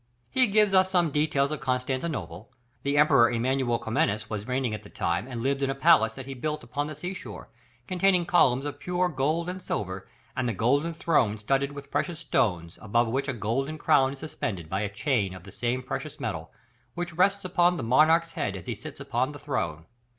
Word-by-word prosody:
He 255 Hz, -1 st, +4 dB
gives 210 Hz, -1 st, +3 dB
us 185 Hz, 0 st, +5 dB
some 175 Hz, -4 st, +2 dB
details 150 Hz, -1 st, +1 dB
of 155 Hz, -, -3 dB
Constantinople; 130 Hz, -, -3 dB, 0.3 s
the 140 Hz, +1 st, 0 dB
Emperor 130 Hz, -5 st, +6 dB
Emmanuel 120 Hz, 0 st, +1 dB
Comnenus 110 Hz, -2 st, -1 dB
was 105 Hz, -1 st, -4 dB
reigning 125 Hz, -3 st, -1 dB
at 105 Hz, -, -4 dB
that 105 Hz, -, -16 dB
time 85 Hz, +7 st, -1 dB
and 120 Hz, -3 st, -5 dB
lived 135 Hz, +1 st, 0 dB
in 135 Hz, -, +1 dB
a 135 Hz, -, -1 dB
palace 135 Hz, -6 st, +4 dB
that 135 Hz, -, -7 dB
he 135 Hz, -, -7 dB
had 130 Hz, -2 st, -9 dB
built 150 Hz, +1 st, -2 dB
upon 145 Hz, 0 st, -3 dB
the 155 Hz, -, -6 dB
sea 180 Hz, +6 st, -5 dB
shore, 110 Hz, -, -9 dB, 0.4 s
containing 185 Hz, 0 st, +2 dB
columns 140 Hz, -7 st, +3 dB
of 145 Hz, -, -5 dB
pure 180 Hz, 0 st, 0 dB
gold 155 Hz, +4 st, 0 dB
and 185 Hz, +1 st, -5 dB
silver, 95 Hz, -, -4 dB, 0.3 s
and 130 Hz, -2 st, 0 dB
"the -, -, -1 dB
golden 140 Hz, -, +1 dB
throne 125 Hz, -11 st, +2 dB
studded 135 Hz, +6 st, 0 dB
with 140 Hz, 0 st, -10 dB
precious 175 Hz, -3 st, -1 dB
stones, 85 Hz, -, 0 dB
above 115 Hz, +2 st, +1 dB
which 135 Hz, +4 st, -1 dB
a 140 Hz, -, -1 dB
golden 125 Hz, +8 st, -2 dB
crown 135 Hz, -2 st, +3 dB
is -, -, -10 dB
suspended 110 Hz, -, -4 dB
by 95 Hz, +1 st, 0 dB
a 105 Hz, -, -1 dB
chain 105 Hz, -3 st, 0 dB
of 95 Hz, -, -11 dB
the 100 Hz, -, -12 dB
same 120 Hz, +4 st, -2 dB
precious 150 Hz, +3 st, -5 dB
metal, 100 Hz, -, -4 dB, 0.4 s
which 175 Hz, -1 st, -4 dB
rests 195 Hz, +3 st, +2 dB
upon 180 Hz, -1 st, +3 dB
the -, -, -4 dB
monarch's 160 Hz, +8 st, +4 dB
head 145 Hz, -, -2 dB
as 90 Hz, -, -10 dB
he -, -, -2 dB
sits -, -, -9 dB
upon 130 Hz, +4 st, -1 dB
the -, -, -8 dB
throne." 85 Hz, -, -3 dB
135 Hz, 210 wpm, -27 LUFS, 115-155 Hz, 0.4 s, Emperor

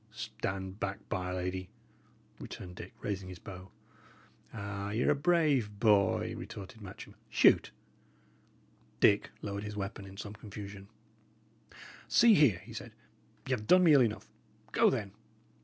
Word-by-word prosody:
"Stand 100 Hz, -3 st, -5 dB
back, 100 Hz, +1 st, -4 dB
by 90 Hz, 0 st, -2 dB
'r 90 Hz, -, -3 dB
Lady!" 90 Hz, 0 st, -3 dB, 0.7 s
returned 90 Hz, 0 st, -8 dB
Dick, -, -, -10 dB
raising 95 Hz, -2 st, -3 dB
his 90 Hz, -, -8 dB
bow. 95 Hz, 0 st, -10 dB, 0.8 s
"Ah, 100 Hz, -2 st, -5 dB
y' 110 Hz, +3 st, -1 dB
are -, -, +4 dB
a -, -, +3 dB
brave 145 Hz, -9 st, +2 dB
boy!" 100 Hz, -4 st, +3 dB
retorted 100 Hz, +3 st, -9 dB
Matcham. 95 Hz, -2 st, -10 dB, 0.2 s
"Shoot!" -, -, +5 dB, 1.3 s
Dick 100 Hz, 0 st, +4 dB
lowered 100 Hz, -1 st, -4 dB
his 105 Hz, 0 st, -6 dB
weapon 100 Hz, 0 st, -5 dB
in 95 Hz, 0 st, -12 dB
some 105 Hz, 0 st, -6 dB
confusion. 100 Hz, -2 st, -9 dB, 1.2 s
"See 235 Hz, -1 st, +6 dB
here," 145 Hz, -, +5 dB
he -, -, -10 dB
said. -, -, -8 dB, 0.5 s
"Y' -, -, -5 dB
have 105 Hz, -4 st, -1 dB
done 185 Hz, 0 st, +7 dB
me 165 Hz, -3 st, +7 dB
ill 140 Hz, -, +7 dB
enough. 110 Hz, -3 st, 0 dB, 0.4 s
Go, -, -, +5 dB
then. 100 Hz, -2 st, -2 dB
100 Hz, 145 wpm, -32 LUFS, 95-110 Hz, 1.3 s, done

